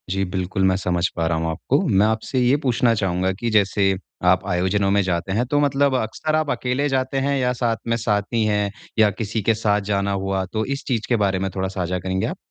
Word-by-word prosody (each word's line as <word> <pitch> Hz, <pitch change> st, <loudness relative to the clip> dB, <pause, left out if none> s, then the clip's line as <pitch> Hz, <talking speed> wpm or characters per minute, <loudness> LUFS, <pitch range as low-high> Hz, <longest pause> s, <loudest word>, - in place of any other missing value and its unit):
जी, 95 Hz, +1 st, 0 dB
बिल्कुल 95 Hz, +1 st, -2 dB
मैं 95 Hz, 0 st, +3 dB
समझ 90 Hz, -2 st, 0 dB
पा 85 Hz, -, -1 dB
रहा 80 Hz, 0 st, 0 dB
हूँ 80 Hz, 0 st, -1 dB
आपको। 80 Hz, -, 0 dB
मैं 100 Hz, +2 st, +4 dB
आपसे 110 Hz, +4 st, -1 dB
ये 125 Hz, +2 st, +4 dB
पूछना 120 Hz, -2 st, +2 dB
चाहूँगा 95 Hz, -2 st, 0 dB
कि 120 Hz, -, -1 dB
जैसे 100 Hz, -2 st, +3 dB, 0.4 s
आप 90 Hz, +1 st, +3 dB
आयोजनों 95 Hz, +2 st, +1 dB
में 100 Hz, 0 st, +3 dB
जाते 90 Hz, 0 st, -2 dB
हैं। 115 Hz, +5 st, +1 dB
तो 145 Hz, -, +3 dB
मतलब 140 Hz, -1 st, +2 dB
अक्सर 130 Hz, +6 st, -1 dB
आप 155 Hz, -2 st, 0 dB
अकेले 130 Hz, +3 st, -1 dB
जाते 130 Hz, 0 st, -1 dB
हैं 140 Hz, +1 st, 0 dB
या 125 Hz, -1 st, +1 dB
साथ 120 Hz, -2 st, -1 dB
में 115 Hz, 0 st, +1 dB
साथी 110 Hz, +1 st, 0 dB
है 105 Hz, -1 st, +1 dB, 0.3 s
या 110 Hz, -1 st, +6 dB
किसी 110 Hz, +2 st, -3 dB
के 115 Hz, +3 st, +2 dB
साथ 105 Hz, -1 st, +1 dB
जाना 100 Hz, 0 st, 0 dB
हुआ। 95 Hz, -1 st, -1 dB
तो 110 Hz, 0 st, 0 dB
इस 140 Hz, +2 st, -4 dB
चीज़ 115 Hz, -5 st, -1 dB
के 120 Hz, -, +3 dB
बारे 95 Hz, -1 st, 0 dB
में 95 Hz, 0 st, -1 dB
थोड़ा 95 Hz, 0 st, -1 dB
साझा 90 Hz, -1 st, -3 dB
करेंगे 95 Hz, +1 st, -2 dB
आप? -, -, -5 dB
105 Hz, 230 wpm, -22 LUFS, 95-120 Hz, 0.4 s, या